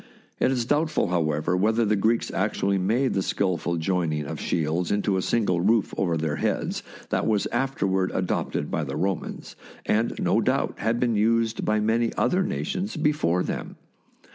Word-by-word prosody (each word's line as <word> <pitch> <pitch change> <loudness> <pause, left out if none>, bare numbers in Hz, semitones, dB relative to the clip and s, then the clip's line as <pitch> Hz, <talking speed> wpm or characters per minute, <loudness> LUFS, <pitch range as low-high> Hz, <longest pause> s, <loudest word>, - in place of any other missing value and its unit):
It - - +3
is 125 -3 0
doubtful, 150 - +1
however, 80 -1 0
whether 110 +5 +2
the 105 0 +2
Greeks 110 +4 +1
actually 100 0 0
made 120 +8 +1
the 95 - +1
skilful 90 -3 -1
join 85 0 0
ing 75 -1 -2
of - - -5
shields 85 +2 -1
into 100 -1 +1
a 95 - +1
single 90 -5 +1
roof 110 +3 +2
over 85 -4 0
their 75 -2 -1
heads - - -1 0.3
that - - 0
was 105 -2 +2
afterward 95 -9 0
adopted 90 -1 -2
by - - 0
the - - -4
Romans, 95 -2 -3 0.3
and 110 +2 +1
no - - +2
doubt - - 0
had 115 +2 0
been 120 -1 +1
used 115 +1 +1
by 110 0 +2
many 115 +2 +1
other 185 +1 +2
nations 190 +1 -2
be 150 0 +3
fore 90 - 0
them. - - -5
100 Hz, 175 wpm, -25 LUFS, 90-115 Hz, 0.3 s, It